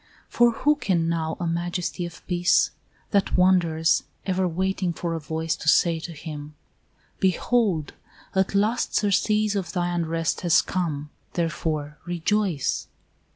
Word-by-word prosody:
For 240 0 +4
who 295 +6 +2
can 175 - +1
know 160 -1 -1
a 175 - -2
majesty 175 +1 -2
of 170 - -13
peace, 175 0 +3 0.4
That 200 -3 +2
wanders, 170 -3 +3 0.2
ever 185 -1 +1
waiting 185 +1 -1
for 170 +1 -3
a 165 - -2
voice 160 +1 -2
To - - -8
say 165 +1 +4
to 170 +1 -7
him, 150 -1 -8 0.6
"Behold, 190 -3 +1 0.4
at 190 0 +1
last 215 +4 +1
surcease 210 +1 +2
Of 180 -4 -3
thy 175 -1 0
unrest 165 -1 -1
has 170 -2 +4
come, 150 -5 -3 0.2
therefore, 155 -3 -2
rejoice"? 175 -2 0
175 Hz, 135 wpm, -25 LUFS, 160-190 Hz, 0.6 s, For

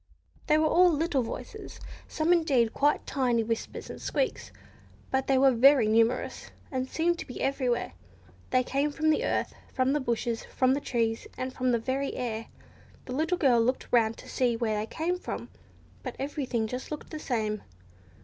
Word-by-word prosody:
They 305 - +5
were 310 - +3
all 355 +3 +5
little 310 -3 +1
voices, 230 - -7 0.3
some 320 +2 +2
indeed 270 -9 +2
quite 290 +1 +2
tiny 245 -4 +1
whispers 225 0 -4
and - - -8
squeaks, - - -2 0.6
but 265 0 0
they 270 - +4
were 270 0 +6
very 255 -1 +6
numerous, 230 +3 +1 0.2
and 260 -1 -2
seemed 340 +1 +1
to - - -6
be 250 - -7
everywhere. 255 - 0 0.6
They 255 - +3
came 280 +3 0
from 315 +2 +2
the 305 - +1
earth, - - -1 0.2
from 260 +1 +1
the 295 - +2
bushes, 235 -2 -1
from 255 0 +1
the 285 - -1
trees, 230 -3 -1
and 255 0 -3
from 255 -1 0
the 235 - +3
very 265 +4 -2
air. 230 -3 -3 0.6
The 250 - -5
little 320 +6 0
girl 255 -8 +4
looked 255 +3 0
round 225 -2 +3
to - - -12
see 245 -2 +1
where 225 -2 0
they 215 - -3
came 345 +6 -2
from, - - -6 0.5
but - - -6
everything 270 -4 -2
looked 220 - -6 0.2
just 300 - -6
the 310 - -5
same. 215 -7 -1
260 Hz, 180 wpm, -28 LUFS, 235-295 Hz, 0.6 s, were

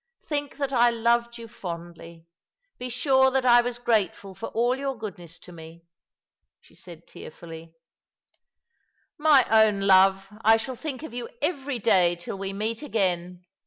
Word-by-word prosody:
Think 290 -2 -4
that 280 -2 -3
I 240 -1 +4
loved 235 +1 0
you 230 -1 -10
fondly. 170 -5 -9 0.5
Be 250 0 -5
sure 265 +1 +3
that 265 -1 -1
I 240 -1 +6
was 245 0 -4
grateful 210 -5 -1
for 195 +5 -7
all 240 +2 0
your 270 -1 -4
goodness 175 -6 -9
to 180 - -15
me," 165 0 -13 0.8
she - - -24
said 170 -2 -13
tearfully, 165 0 -12 0.7
" - - -61 0.7
My 295 -4 +5
own 220 -2 +3
love, 195 0 +4 0.2
I 225 +1 +6
shall 255 +3 -5
think 285 +1 -6
of 315 - -9
you 245 -1 -6
every 285 -4 -2
day 185 -6 +3
till 175 +3 -8
we 195 0 -4
meet 215 +3 -3
again." 180 - -2
225 Hz, 160 wpm, -25 LUFS, 180-250 Hz, 0.8 s, I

